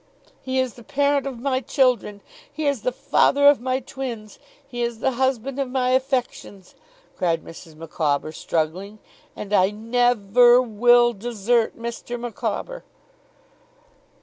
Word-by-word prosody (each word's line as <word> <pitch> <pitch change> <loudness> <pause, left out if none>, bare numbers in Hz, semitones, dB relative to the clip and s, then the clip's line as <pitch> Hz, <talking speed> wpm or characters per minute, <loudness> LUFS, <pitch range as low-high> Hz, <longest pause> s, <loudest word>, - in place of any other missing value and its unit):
'He 260 0 -3
is 260 -3 0
the 240 - -15
parent 285 +1 0
of 265 -3 -6
my 260 0 0
children! 250 -7 0 0.3
He 315 - -5
is 280 -5 0
the 250 - -1
father 285 +3 +2
of 285 -3 +6
my 255 +1 -1
twins! 240 -5 -7 0.3
He 245 -3 -6
is 235 -1 -2
the 265 - 0
husband 260 +1 -1
of 270 -2 -2
my 255 -1 0
affections,' 255 -7 -2 0.4
cried 165 -2 -1
Mrs. 165 -1 -13
Micawber, 155 -2 -2
struggling; 170 +7 -3 0.4
'and 210 0 -7
I 190 -1 +4
ne 245 +4 +1
ver 240 +4 +5
will 240 +1 +3
desert 230 +1 -1
Mr. 235 +1 -6
Micawber! 240 - -5
240 Hz, 140 wpm, -22 LUFS, 210-260 Hz, 0.4 s, of